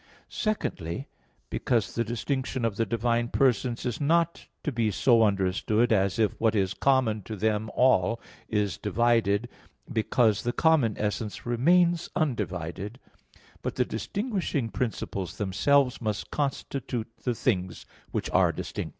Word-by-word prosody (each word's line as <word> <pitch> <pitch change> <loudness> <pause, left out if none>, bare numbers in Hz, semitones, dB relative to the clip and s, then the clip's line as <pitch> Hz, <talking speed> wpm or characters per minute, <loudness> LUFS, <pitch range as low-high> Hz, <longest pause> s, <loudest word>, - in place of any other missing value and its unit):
Secondly: 135 - -3 0.4
because 115 -5 0
the 115 - 0
distinction 125 +2 -2
of 110 -3 -1
the 115 +1 0
divine 115 +1 +1
persons 125 -1 +1
is 125 +1 -2
not 165 +3 +1 0.2
to 150 - -1
be 115 -3 +1
so 115 +3 +4
understood 105 +3 +2
as 100 0 +2
if 110 -2 +3
what 110 -1 +3
is 95 -2 +1
common 125 -4 +2
to 110 +3 -7
them 110 +1 0
all 115 -3 +3 0.3
is 105 -2 0
divided, 115 -1 +2 0.5
because 110 -1 +2
the 120 0 -1
common 155 -10 +3
essence 105 0 -3
remains 170 +8 +3
undivided; 105 - -2 0.6
but - - -3
the - - +2
distinguishing 195 - -2
principles 105 -6 -3
themselves 125 +7 +2
must 110 -2 -3
constitute 135 -4 -2 0.2
the 125 -2 0
things 95 -8 -1 0.2
which - - -2
are - - +4
distinct. - - -5
115 Hz, 135 wpm, -27 LUFS, 105-130 Hz, 0.6 s, so